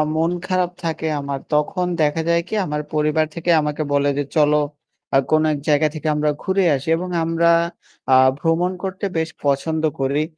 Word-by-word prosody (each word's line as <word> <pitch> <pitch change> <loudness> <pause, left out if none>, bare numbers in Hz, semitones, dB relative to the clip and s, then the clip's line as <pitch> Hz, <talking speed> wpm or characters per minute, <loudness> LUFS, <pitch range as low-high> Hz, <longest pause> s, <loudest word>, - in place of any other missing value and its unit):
মন 165 +2 +1 0.2
খারাপ 185 -1 0
থাকে 160 -1 -3
আমার 140 -1 -4
তখন 180 +5 +1 0.2
দেখা 150 +2 +1
যায় 170 0 +3
কি? - - -8
আমার 150 -1 -2
পরিবার 155 +1 +2
থেকে 170 +1 -4
আমাকে 150 +1 -2
বলে 140 0 +2
যে, 145 - +1
"চলো 150 0 +4 0.6
আ - - +7
কোন 155 0 +4
এক 145 - -4
জায়গা 150 +1 +4
থেকে 155 0 -4
আমরা 150 0 +1
ঘুরে 190 0 +1
আসি" 135 +3 -6
এবং 180 +2 -5
আমরা 165 +1 +2 0.6
আ - - +8 0.2
ভ্রমণ 165 +3 +1
করতে 190 +1 -4
বেশ 160 0 0 0.2
পছন্দ 150 +3 0 0.2
করি। 140 +3 +1
155 Hz, 180 wpm, -20 LUFS, 150-170 Hz, 0.6 s, আ